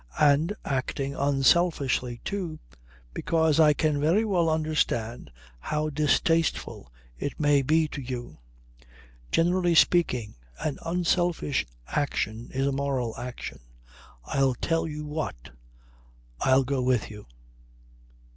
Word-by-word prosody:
And 150 +6 +3
acting 135 +1 -2
unselfishly 140 -3 +1
too, 180 -6 -3 0.6
because 160 -2 +1
I 150 -2 +6
can 150 -1 0
very 175 +9 +3
well 175 -6 +2
understand 150 - -1 0.3
how 150 - -2
distasteful 155 - 0 0.3
it 145 - -4
may 145 -2 +4
be 155 +4 +2
to 145 - -6
you. 120 - -6 0.9
Generally 175 +1 +2
speaking, 130 -11 +3 0.2
an 150 -3 -3
unselfish 175 - 0 0.2
action 120 - -2
is 135 +1 -1
a 140 - +1
moral 135 -4 -2
action. 125 0 -7 0.7
I'll 135 - +1
tell 165 +6 -1
you 150 -1 -6
what. 150 - -5 0.9
I'll 130 +1 +4
go 135 0 -1
with 125 -4 +1
you." 105 -1 -11
145 Hz, 110 wpm, -27 LUFS, 130-160 Hz, 0.9 s, I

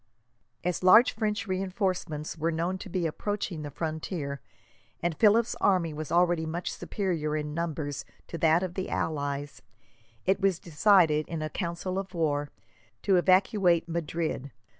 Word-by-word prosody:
As 180 0 -1
large 215 +7 +7
French 215 -1 -1
reinforcements 185 -6 -2
were 165 +1 -1
known 170 +3 -1
to 195 - -8
be 180 -1 -1
approaching 180 0 -3
the 145 - -5
frontier, 155 -2 -4 0.6
and 170 -2 -1
Philip's 220 +4 +4
army 180 -5 +2
was 155 0 -6
already 175 -1 +3
much 170 +2 -3
superior 165 -7 -2
in 150 -1 -4
numbers 155 -4 -3 0.2
to 170 - -7
that 160 +3 +4
of 180 -2 -3
the 190 0 -4
allies, 145 -2 -3 0.6
it 190 +1 +2
was 195 -3 +3
decided, 165 -2 +3
in 165 -2 -4
a 155 - -4
council 185 +1 -3
of 195 -1 -7
war, 145 -3 0 0.5
to 195 -2 +4
evacuate 185 -1 +3
Madrid. 165 -4 -3
170 Hz, 145 wpm, -28 LUFS, 155-185 Hz, 0.6 s, large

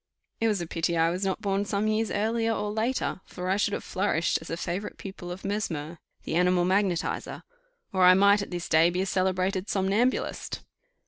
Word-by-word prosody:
It 225 - +2
was 210 -4 +1
a - - -3
pity 165 +1 -1
that 165 - +1
I 165 - +4
was 180 +3 -3
not 195 +2 -1
born 200 0 +1
some 205 +1 -1
years 215 +1 +1
earlier 225 +2 0
or 210 -1 -2
later, 220 -2 -1
for 180 +1 -4
I - - +3
should 205 0 +1
have - - -3
flourished 185 -3 0
a 165 0 -5
favourite 180 +4 -4
pupil 190 -2 -8
of 180 +2 -7
Mesmer, 170 -6 -3 0.2
the - - -4
animal 180 +1 +3
magnetizer, 185 -2 0 0.5
or 185 -1 +3
I 180 0 +8
might 200 +1 +5
at 200 - -5
this 175 -2 -4
day 160 +1 +5
be 180 +1 -1
a - - 0
celebrated 185 +1 0
somnambulist. 205 +6 0
190 Hz, 200 wpm, -27 LUFS, 175-205 Hz, 0.5 s, I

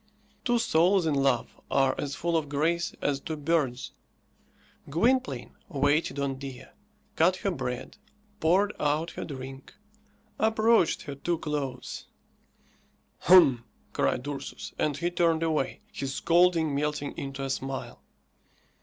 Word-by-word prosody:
Two 240 -1 +2
souls 185 -4 +3
in 155 - +1
love 135 -4 0
are 135 -1 +3
as 140 -1 -3
full 170 0 -1
of 155 -3 0
grace 165 +4 0
as 140 -1 +1
two 160 +3 -5
birds. 145 -5 0 1.0
Gwynplaine 165 - +1
waited 145 +2 +1
on 135 -1 -2
Dea, 135 -2 -8 0.5
cut 175 +3 +4
her 195 +1 -2
bread, 125 - -5 0.4
poured 190 +6 +3
out 150 +3 0
her - - -6
drink, 135 +1 -8 0.6
approached 220 -3 +3
her 140 - -6
too 170 +5 -2
close. 145 -5 -4 1.1
"Hum!" 155 -10 +6 0.3
cried 130 - 0
Ursus, 140 -1 -6
and 145 -2 0
he 170 +2 -1
turned 165 -2 +2
away, 155 -5 -1
his 135 -1 -4
scolding 170 -3 +3
melting 150 0 -2
into 135 0 -5
a 135 - -3
smile. 135 0 -4
150 Hz, 125 wpm, -28 LUFS, 135-170 Hz, 1.1 s, Hum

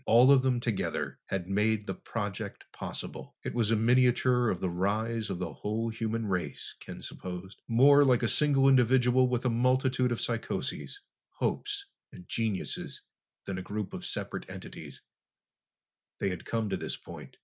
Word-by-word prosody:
All 120 +4 +7
of 135 -2 +7
them 130 -2 +1
together 115 -4 -2
had 90 -2 -3
made 105 +2 +1
the - - -3
project 105 -4 -5
possible. - - -7
It - - -3
was 115 -3 +1
a 115 - +4
miniature 125 +1 +4
of 90 - -1
the 95 - -1
rise 110 +5 -1
of - - -2
the 90 -3 -4
whole 110 - -2
human 115 0 -2
race, 95 -3 -3
Ken - - -9
supposed. 90 +2 -7
More 140 +5 +7
like 125 -3 +3
a - - +3
single 140 +1 +4
individual 125 -1 +5
with 125 0 -1
a - - +4
multitude 125 +1 +2
of 120 - -1
psychoses, 120 - -3 0.3
hopes, 410 -1 -2 0.3
and 90 - -13
geniuses, 110 -4 -3 0.4
than 95 -2 -3
a 90 - -9
group 105 -2 -3
of - - -6
separate - - -4
entities, - - -9 1.1
they 100 - 0
had 90 -3 -5
come 115 -2 -1
to 95 - 0
this - - -4
point. - - -11
115 Hz, 165 wpm, -30 LUFS, 100-125 Hz, 1.1 s, All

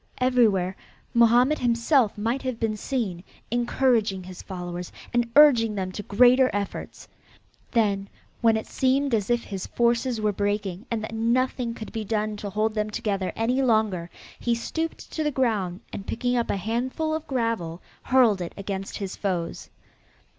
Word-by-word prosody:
Everywhere 220 -8 +2 0.4
Mohammed 240 +5 +5
himself 235 -1 +2
might 230 +6 -1
have 255 -3 -3
been 220 -1 0
seen, 210 -7 -3 0.3
encouraging 235 -5 +1
his 185 0 -9
followers 180 -2 -6 0.2
and 240 -1 +1
urging 240 -8 +6
them 185 -2 -2
to 205 - -5
greater 250 +6 +5
efforts. 200 -1 -5 0.6
Then, 200 -4 +1 0.3
when 225 -1 +4
it 220 - -4
seemed 270 +1 +1
as 210 -2 +1
if 240 0 +2
his 195 -2 -5
forces 235 0 +1
were 215 -1 +1
breaking 205 -1 -2
and 225 -2 -2
that 220 - -6
nothing 235 +1 0
could 220 - -8
be 225 -2 -3
done 215 0 -1
to 205 0 -5
hold 215 +2 0
them 215 -1 -1
together 195 -3 -2
any 245 +4 +1
longer, 215 -8 +1 0.3
he 235 -1 +1
stooped 325 +8 -4
to 315 - -2
the 300 - +1
ground 215 -9 0
and 195 - -6
picking 245 +1 -1
up 235 -1 0
a - - 0
handful 250 - -2
of 320 0 -3
gravel, 230 -10 -1 0.2
hurled 240 -7 +4
it 170 - -5
against 195 -1 -4
his 195 -2 -5
foes. 180 -4 -3
225 Hz, 160 wpm, -25 LUFS, 200-245 Hz, 0.6 s, urging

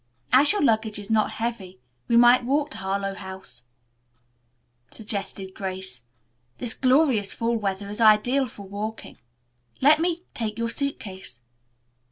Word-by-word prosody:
"As 280 +3 +7
your 410 -4 0
luggage 220 -4 +1
is 205 +1 -7
not 215 -1 +3
heavy, 225 - -4 0.3
we 235 - +3
might 245 +1 +6
walk 285 +4 0
to - - -7
Harlowe 195 +1 -2
House," 190 -11 -6 1.2
suggested 200 -3 -5
Grace. 190 - -5 0.5
"This 240 -3 +1
glorious 255 -6 +2
fall 235 +1 0
weather 200 -2 -3
is 210 +3 -5
ideal 235 +5 +4
for 210 -3 -11
walking. 205 +3 -7 0.6
Let 300 +3 +5
me 345 +1 -1
take 215 -2 -4
your 230 0 -1
suit 280 +4 -2
case." 185 - -8
220 Hz, 140 wpm, -25 LUFS, 195-250 Hz, 1.2 s, As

